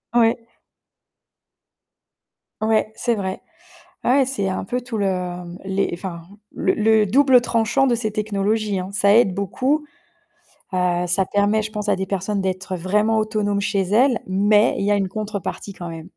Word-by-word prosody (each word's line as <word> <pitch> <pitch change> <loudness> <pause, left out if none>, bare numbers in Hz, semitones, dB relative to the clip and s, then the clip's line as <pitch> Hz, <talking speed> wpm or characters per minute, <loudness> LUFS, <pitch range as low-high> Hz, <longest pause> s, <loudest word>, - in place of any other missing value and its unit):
Ouais. 230 0 +4 2.2
Ouais, 220 0 +1
c'est 240 +1 0
vrai. 190 -3 -4 0.6
Ouais, 265 +2 +4
c'est 250 -7 -2
un 190 - -2
peu 245 +6 -2
tout 245 -2 -6
le, 200 - 0
mmh, 180 -1 -4
les, 195 +1 0
enfin, 170 -1 -6 0.3
le - - +1
le 220 0 +3
double 260 +4 +5
tranchant 230 +3 +1
de 240 - +2
ces 220 -2 -2
technologies 210 -1 -1
hein. 185 - -5
Ça 200 0 +3
aide 220 -4 +4
beaucoup. 255 - -1 0.9
Bah, 180 -1 0
ça 185 +2 +1
permet, 205 +3 +1
je 215 0 -5
pense, 210 -1 -3
à - - +3
des 190 - -2
personnes 195 +1 -2
d'être 185 0 -3
vraiment 210 +5 +1
autonomes 210 -2 -1
chez 200 -1 0
elles, 230 +6 +3
mais 205 +4 +3
il 200 - -1
y 205 - +2
a 205 - +4
une 195 -1 0
contrepartie 205 -1 -5
quand 175 -2 -7
même. 165 -1 -8
205 Hz, 165 wpm, -21 LUFS, 190-220 Hz, 2.2 s, double